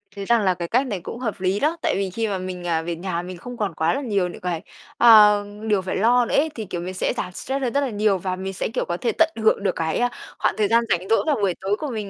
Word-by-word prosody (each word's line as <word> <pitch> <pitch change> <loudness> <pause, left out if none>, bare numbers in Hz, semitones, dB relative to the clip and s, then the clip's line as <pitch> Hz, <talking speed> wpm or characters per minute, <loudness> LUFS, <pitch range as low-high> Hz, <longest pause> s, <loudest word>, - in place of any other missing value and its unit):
Thấy 200 -1 -5
rằng 235 +1 +3
là 190 -2 +2
cái 170 -1 -5
cách 255 +7 +1
này 200 -6 -3
cũng 230 - -7
hợp 225 -6 -3
lý 190 +2 +1
đó! 315 +3 +1
Tại - - +1
vì 195 -1 -1
khi 225 +4 -2
mà 200 - -2
mình, 185 -1 -6
à, 165 -1 +1
về 170 0 -4
nhà 175 0 -3
mình 180 0 -8
không 245 +7 -9
còn 205 -6 -2
quá 160 +1 +1
là 275 - -2
nhiều 200 -8 0
những 175 - -9
cái, 175 -3 -2 0.4
ờm, 210 -2 +5
điều 205 -3 +2
phải 185 - -4
lo 240 +4 +4
nữa - - -2
ấy, 310 +3 +3
thì, 220 - -5
kiểu, 175 -2 -5
mình 185 +1 -5
sẽ 185 - -1
giảm 180 - -3
stress 270 +9 -4
hơn 250 -2 -1
rất 280 - +2
là 275 - -1
nhiều 210 -2 +1
và 185 0 -3
mình 190 +1 -5
sẽ, - - -2
kiểu, - - -1
có 175 - -3
thể 230 +4 0
tận 325 0 +3
hưởng 220 -2 +3
được 190 - 0
cái, 160 -1 -1
à, 245 0 +2 0.3
khoảng - - +1
thời 210 -2 +2
gian 230 +2 +3
rảnh 180 +2 0
rỗi 225 - +3
vào 300 - +3
buổi 200 -6 0
tối 195 +2 0
của 300 - -3
mình 210 -4 -4
200 Hz, 315 wpm, -23 LUFS, 185-230 Hz, 0.4 s, ờm